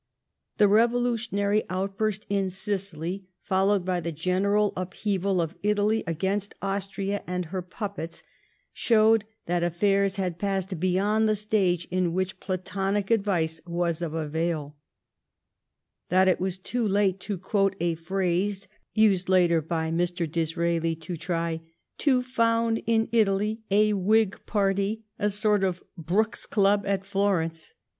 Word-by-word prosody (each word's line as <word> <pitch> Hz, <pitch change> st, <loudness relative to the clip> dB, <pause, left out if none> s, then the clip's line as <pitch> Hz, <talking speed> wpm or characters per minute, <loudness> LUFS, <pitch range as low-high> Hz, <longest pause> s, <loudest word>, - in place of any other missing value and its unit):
The 210 Hz, -, +6 dB
revolutionary 225 Hz, -2 st, +2 dB
out* 190 Hz, +2 st, -2 dB
burst 215 Hz, -1 st, -1 dB
in 195 Hz, -1 st, 0 dB
Sicily, 190 Hz, -2 st, -3 dB, 0.2 s
followed 195 Hz, 0 st, +2 dB
by 185 Hz, -1 st, 0 dB
the 170 Hz, 0 st, -3 dB
general 195 Hz, +6 st, +1 dB
upheaval 190 Hz, +1 st, -1 dB
of 165 Hz, -1 st, -1 dB
Italy 210 Hz, +1 st, +1 dB
against 195 Hz, +5 st, -1 dB
Austria 195 Hz, 0 st, -3 dB
and 180 Hz, 0 st, -2 dB
her 185 Hz, +3 st, -4 dB
puppets, 180 Hz, -2 st, -6 dB, 0.5 s
showed 220 Hz, -2 st, +4 dB, 0.2 s
that 175 Hz, 0 st, 0 dB
affairs 195 Hz, +3 st, +2 dB
had 180 Hz, -4 st, -3 dB
passed 195 Hz, -2 st, -2 dB
beyond 200 Hz, +5 st, +2 dB
the 215 Hz, -, +3 dB
stage 195 Hz, -5 st, +1 dB
in 180 Hz, -2 st, +1 dB
which 185 Hz, +1 st, -2 dB
platonio 195 Hz, +2 st, -2 dB
advice 175 Hz, -7 st, +1 dB
was 170 Hz, -1 st, -1 dB
of 165 Hz, -2 st, -3 dB
avail; 155 Hz, -1 st, -2 dB, 1.3 s
that 185 Hz, +1 st, +4 dB
it 185 Hz, -, +3 dB
was 185 Hz, 0 st, -1 dB
too 230 Hz, +4 st, -2 dB
late, 195 Hz, -1 st, +2 dB
to 200 Hz, +1 st, -4 dB
quote 195 Hz, +1 st, +1 dB
a» 170 Hz, 0 st, +1 dB
phrase 190 Hz, +3 st, -1 dB, 0.3 s
used 195 Hz, -4 st, +3 dB
later 175 Hz, -3 st, +4 dB
by 160 Hz, 0 st, -2 dB
Mr. 175 Hz, +1 st, 0 dB
Disraeli, 165 Hz, +1 st, 0 dB
to 165 Hz, +2 st, -6 dB
try 165 Hz, -1 st, -2 dB, 0.2 s
*' -, -, -52 dB
to 255 Hz, -3 st, +4 dB
found 230 Hz, -2 st, +1 dB
in 225 Hz, -1 st, +2 dB
Italy 215 Hz, 0 st, +1 dB
a 210 Hz, +1 st, +4 dB
Whig 205 Hz, +1 st, +2 dB
party, 200 Hz, +1 st, 0 dB, 0.2 s
a 210 Hz, -1 st, +2 dB
sort 210 Hz, 0 st, +2 dB
of 185 Hz, -1 st, -1 dB
Brooks's 190 Hz, +6 st, -1 dB
club 200 Hz, 0 st, +2 dB
at 195 Hz, -1 st, 0 dB
Florence. 185 Hz, -5 st, -1 dB
195 Hz, 135 wpm, -26 LUFS, 175-205 Hz, 1.3 s, The